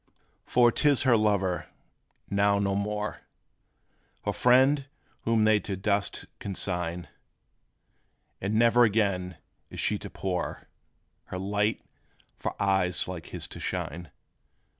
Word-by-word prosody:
For 120 -1 +5
't 145 - +3
is 140 -3 +3
her 130 -3 +5
lover, 100 -5 +1 0.6
now 100 0 +2
no 100 -1 0
more 105 +1 -2 1.0
Her - - 0
friend, 130 +3 +4 0.4
whom 115 -1 +3
they 110 -1 +5
to 100 -1 -4
dust 100 +1 -1
consign! 90 -3 -3 1.3
And 100 +3 -1
ne'er 120 +2 +5
again 100 -6 +1 0.3
is - - -8
she - - +1
to - - -7
pour 90 -2 -4 0.6
Her 90 - -6
light, 105 +3 0 0.5
for - - -5
eyes 95 -2 +1
like 90 -3 -6
his - - -5
to - - -8
shine. 85 +2 -4
100 Hz, 120 wpm, -28 LUFS, 95-110 Hz, 1.3 s, For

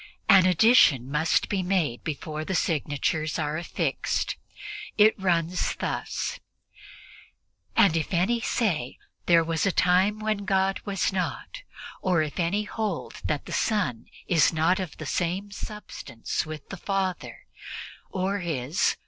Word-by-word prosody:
An 185 -2 +7
addition 170 - +5
must 155 +2 +2
be 195 -2 0
made 175 -10 0
before 155 0 -4
the 190 +4 -3
signatures 155 0 0
are 150 -1 -1
affixed. 170 +2 -1 0.6
It 215 +1 +7
runs 175 -1 +1
thus: - - -3 1.4
"And 175 -5 +5
if 160 -2 -1
any 190 +7 +2
say, 180 - -1 0.3
'There 170 -1 +6
was 165 +2 0
a - - +3
time 185 +4 +3
when 215 -1 -2
God 190 0 +1
was 195 -1 0
not; 190 - -3 0.4
or 175 -4 +2
if 150 +1 -5
any 185 +5 +1
hold 210 -4 -4
that 150 -2 -1
the - - -7
Son 185 - 0 0.2
is 165 -5 +4
not 165 +4 +2
of 185 -5 -5
the 155 - -7
same 185 +6 -2
substance 205 - -5
with 155 -2 -8
the 195 - -6
Father, 190 0 -3 0.6
or 195 +2 -1
is 155 -4 0
180 Hz, 135 wpm, -26 LUFS, 155-195 Hz, 1.4 s, An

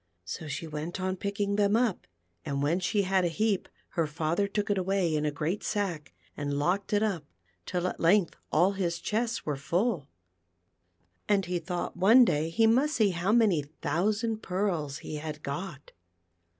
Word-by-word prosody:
So 155 - -6
she 150 +3 -4
went 155 +3 -5
on 185 0 -1
picking 200 +1 -2
them 205 0 +3
up, 230 -5 +1 0.4
and 140 0 -2
when 165 +5 +2
she 195 +3 +1
had 190 0 +2
a - - +3
heap 205 +3 0 0.2
her 165 -2 0
father 160 +6 0
took 205 0 -1
it 200 - +1
away 185 -3 +1
in 150 0 0
a - - 0
great 155 +7 -2
sack, 180 - -2 0.2
and 145 -1 -2
locked 180 +7 0
it 210 0 +3
up, 185 -9 -1 0.4
till 180 -1 -1
at 185 - -2
length 175 +1 +3 0.2
all 175 +5 +4
his 180 -4 -1
chests 225 +5 -2
were 150 - -1
full, 170 - 0 1.2
and 200 -2 +3
he 175 0 -1
thought 175 +1 -4
one 220 +8 +7
day 155 -4 +1
he 225 +7 +3
must 265 +7 +3
see 210 -3 +3
how 175 +3 0
many 210 -10 +3 0.2
thou 170 +8 +1
sand 220 +1 -1
pearls 180 -8 -1
he 155 - -6
had 155 0 -6
got. 145 0 -5
185 Hz, 180 wpm, -29 LUFS, 155-205 Hz, 1.2 s, one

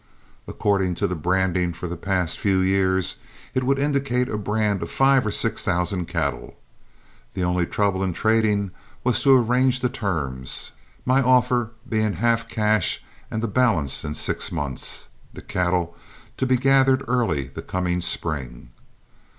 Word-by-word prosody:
According 95 -3 0
to - - -1
the 90 - -1
branding 90 +1 0
for 85 - -7
the 85 - -4
past 90 -1 -2
few 95 -2 +2
years, 95 -1 +1 0.4
it 130 0 0
would 135 +2 +2
indicate 135 -3 0
a - - -2
brand 105 -1 0
of 85 - -4
five 135 -1 +3
or - - +1
six 115 +2 +1
thousand 90 -1 -1
cattle. 80 -6 -3 0.8
The 95 - -2
only 90 -1 +1
trouble 100 -2 0
in 95 - 0
trading 105 -2 +1 0.3
was 120 -1 +2
to 135 -1 +6
arrange 125 +2 +2
the 125 - +1
terms, 80 - -2 0.3
my 130 +2 +3
offer 125 -2 +3 0.2
being 110 -2 0
half 115 +4 0
cash 105 -3 +1 0.3
and 110 - -3
the - - +1
balance 105 - +2
in 75 - -4
six - - -1
months, 70 -6 -3 0.3
the - - -8
cattle 90 -1 -1 0.4
to 130 - 0
be 130 0 +3
gathered 135 +1 +4
early 110 - 0
the - - -8
coming 90 -1 -2
spring. 65 -9 -3
100 Hz, 155 wpm, -23 LUFS, 90-125 Hz, 0.8 s, to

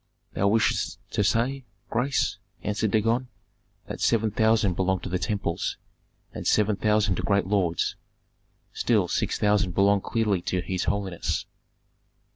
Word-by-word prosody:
"Thou 100 - +1
wishest 110 +2 +1
to 105 - +1
say, 125 +6 +1 0.3
grace," 125 +3 0 0.3
answered 105 +1 0
Dagon, 115 +4 +1 0.6
"that - - -6
seven 110 -2 +2
thousand 110 -2 +3
belong 95 +1 0
to 95 - -6
the 90 0 -1
temples, 100 -5 -2 0.6
and - - -5
seven 105 0 +3
thousand 105 -2 +1
to - - -1
great 100 -2 +1
lords. 95 -4 0 0.8
Still 105 -7 +2
six - - -1
thousand 105 -4 +1
belong 100 0 +4
clearly 105 -5 0
to 90 +1 -1
his 90 0 -2
holiness." 95 -4 -2
105 Hz, 135 wpm, -26 LUFS, 95-110 Hz, 0.8 s, belong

